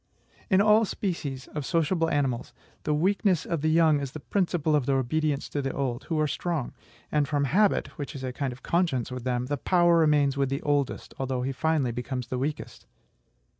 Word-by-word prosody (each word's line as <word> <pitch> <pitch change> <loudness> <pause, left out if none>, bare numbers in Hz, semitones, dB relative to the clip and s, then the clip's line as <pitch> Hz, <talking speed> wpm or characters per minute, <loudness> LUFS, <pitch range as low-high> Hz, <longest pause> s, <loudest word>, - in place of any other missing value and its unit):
In 190 0 +5
all 215 +2 +5
species 155 -11 -3
of 150 - -4
sociable 165 +3 +1
animals, 135 -5 -1 0.3
"the 150 - +1
weakness 185 +1 +2
of 165 -4 -2
the 155 - +2
young 160 -2 +4
is 140 -2 -5
the 155 - -6
principle 170 -2 0
of 145 -4 0
their 135 -1 +3
obedience 145 +3 0
to 145 - -2
the 135 -1 -2
old," 130 -2 -3
who 160 -2 -1
are 155 - +3
strong; 155 -2 -2 0.4
and 150 -2 +2
from 145 -1 0
habit, 200 +9 +2
which 145 - -5
is 135 - -6
a 130 -1 -3
kind 135 0 -2
of 125 +2 -12
conscience 165 -9 0
with 125 -1 -6
them, 125 -1 0
the 145 +2 -2
power 175 +2 +3
remains 145 -3 +3
with 140 -1 +1
the 135 +1 -3
oldest, 145 -3 -1
although 130 -1 -1
he 135 - -1
finally 145 -2 0
becomes 125 0 -4
the 125 - -2
weakest. 145 +3 -5
145 Hz, 205 wpm, -27 LUFS, 130-165 Hz, 0.4 s, In